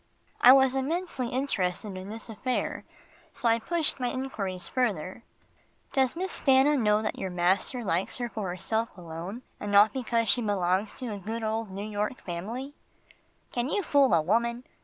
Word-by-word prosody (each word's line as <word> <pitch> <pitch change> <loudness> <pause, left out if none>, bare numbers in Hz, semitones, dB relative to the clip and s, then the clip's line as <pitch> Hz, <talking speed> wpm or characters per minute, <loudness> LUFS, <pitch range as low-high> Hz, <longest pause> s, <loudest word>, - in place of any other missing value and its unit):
I 245 - +10
was 265 -1 +6
intensely 270 -1 -2
interested 210 -7 -1
in 185 +1 -7
this 225 +1 -6
affair, 245 +3 -3 0.5
so 240 - -1
I 230 0 +4
pushed 320 +5 0
my 250 - 0
enquiries 195 -9 -3
further. 210 -4 -1 0.7
"Does 265 0 +2
Miss 370 +2 -3
Stanna 270 +2 +5
know 215 -4 +2
that 215 - -3
your 190 - -2
master 185 +7 +1
likes 185 -2 -1
her 245 -1 -2
for 215 -5 -4
herself 220 +6 -1
alone, 175 +7 -7 0.2
and 205 - -4
not 205 +1 +6
because 235 -3 0
she 245 - +3
belongs 200 -1 0
to 245 -5 -5
a 200 - -6
good 225 +4 -4
old 220 0 -2
New 200 +2 -5
York 210 +3 -2
family?" 225 +11 -5 0.8
"Can 245 +2 -1
you 405 - 0
fool 285 - +4
a 160 - +3
woman?" 235 +6 +1
225 Hz, 170 wpm, -28 LUFS, 195-255 Hz, 0.8 s, I